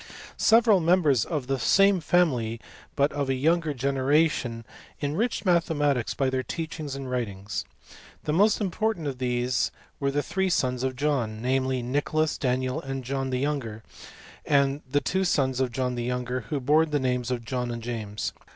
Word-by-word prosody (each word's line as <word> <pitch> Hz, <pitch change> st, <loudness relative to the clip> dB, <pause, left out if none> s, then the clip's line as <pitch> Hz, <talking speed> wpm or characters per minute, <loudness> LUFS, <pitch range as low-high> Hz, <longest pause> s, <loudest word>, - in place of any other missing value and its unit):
Several 225 Hz, -3 st, +5 dB
members 160 Hz, -, +3 dB
of 150 Hz, -6 st, -3 dB
the 135 Hz, 0 st, -1 dB
same 195 Hz, -, +4 dB
family, 135 Hz, -10 st, +1 dB, 0.4 s
but 140 Hz, 0 st, +2 dB
of 140 Hz, -2 st, -2 dB
a 135 Hz, -, +2 dB
younger 160 Hz, +4 st, +1 dB
generation, 135 Hz, -3 st, +1 dB, 0.3 s
enriched 170 Hz, +13 st, -1 dB
mathematics 150 Hz, -8 st, +1 dB
by 135 Hz, -, +1 dB
their 130 Hz, 0 st, 0 dB
teaching 155 Hz, +1 st, -5 dB
and 135 Hz, -1 st, -6 dB
writings. 105 Hz, -5 st, -3 dB, 0.6 s
The 150 Hz, -, -1 dB
most 205 Hz, +5 st, +4 dB
important 210 Hz, -2 st, -1 dB
of 135 Hz, -3 st, -4 dB
these 125 Hz, 0 st, 0 dB, 0.3 s
were 140 Hz, -, +1 dB
the 145 Hz, +1 st, 0 dB
three 190 Hz, -1 st, -1 dB
sons 125 Hz, -7 st, 0 dB
of 130 Hz, 0 st, -1 dB
John; 125 Hz, -6 st, -1 dB
namely, 130 Hz, +1 st, 0 dB
Nicholas, 145 Hz, +4 st, 0 dB
Daniel, 130 Hz, +3 st, 0 dB
and 135 Hz, -2 st, -5 dB
John 135 Hz, +1 st, -2 dB
the 130 Hz, -, -1 dB
younger; 125 Hz, -6 st, -3 dB, 0.6 s
and 140 Hz, 0 st, +2 dB
the 145 Hz, +2 st, +2 dB
two 190 Hz, +1 st, 0 dB
sons 130 Hz, -8 st, +1 dB
of 130 Hz, -2 st, 0 dB
John 125 Hz, +1 st, -1 dB
the 120 Hz, -1 st, -3 dB
younger, 125 Hz, -1 st, -2 dB
who 145 Hz, -, -1 dB
bore 150 Hz, +5 st, +3 dB
the 150 Hz, -1 st, 0 dB
names 125 Hz, -2 st, -1 dB
of 120 Hz, -2 st, -3 dB
John 125 Hz, 0 st, -2 dB
and 115 Hz, -1 st, -5 dB
James. 110 Hz, -3 st, -4 dB
135 Hz, 170 wpm, -26 LUFS, 125-155 Hz, 0.6 s, Several